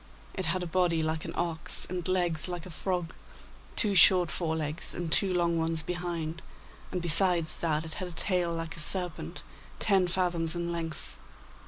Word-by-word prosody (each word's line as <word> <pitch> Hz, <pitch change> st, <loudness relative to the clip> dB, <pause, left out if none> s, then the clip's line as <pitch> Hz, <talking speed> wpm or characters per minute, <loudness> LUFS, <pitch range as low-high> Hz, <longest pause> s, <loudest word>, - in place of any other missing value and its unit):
It 190 Hz, -4 st, -2 dB
had 185 Hz, -1 st, 0 dB
a -, -, -3 dB
body 170 Hz, -2 st, +1 dB
like 160 Hz, 0 st, -2 dB
an -, -, -6 dB
ox, 165 Hz, -2 st, +1 dB
and 180 Hz, -1 st, -1 dB
legs 175 Hz, -4 st, +1 dB
like 175 Hz, -2 st, -5 dB
a 180 Hz, -, -9 dB
frog, 175 Hz, 0 st, -3 dB, 0.6 s
two 210 Hz, -3 st, +3 dB
short 180 Hz, -1 st, +7 dB
fore 160 Hz, -3 st, -2 dB
legs, 155 Hz, 0 st, -3 dB
and 170 Hz, -2 st, -4 dB
two 195 Hz, +2 st, +3 dB
long 170 Hz, -2 st, +1 dB
ones 160 Hz, 0 st, 0 dB
behind, 170 Hz, -1 st, -4 dB, 0.5 s
and 180 Hz, -2 st, -3 dB
besides 170 Hz, -1 st, +3 dB
that 160 Hz, -1 st, 0 dB
it 160 Hz, -, -5 dB
had 185 Hz, -, -5 dB
a -, -, -8 dB
tail 175 Hz, 0 st, +1 dB
like 165 Hz, -1 st, -4 dB
a -, -, -9 dB
serpent, 170 Hz, -1 st, -1 dB, 0.3 s
ten 195 Hz, -4 st, +3 dB
fathoms 175 Hz, -2 st, +1 dB
in 170 Hz, 0 st, -2 dB
length. 165 Hz, -2 st, -5 dB
170 Hz, 180 wpm, -29 LUFS, 160-180 Hz, 0.6 s, short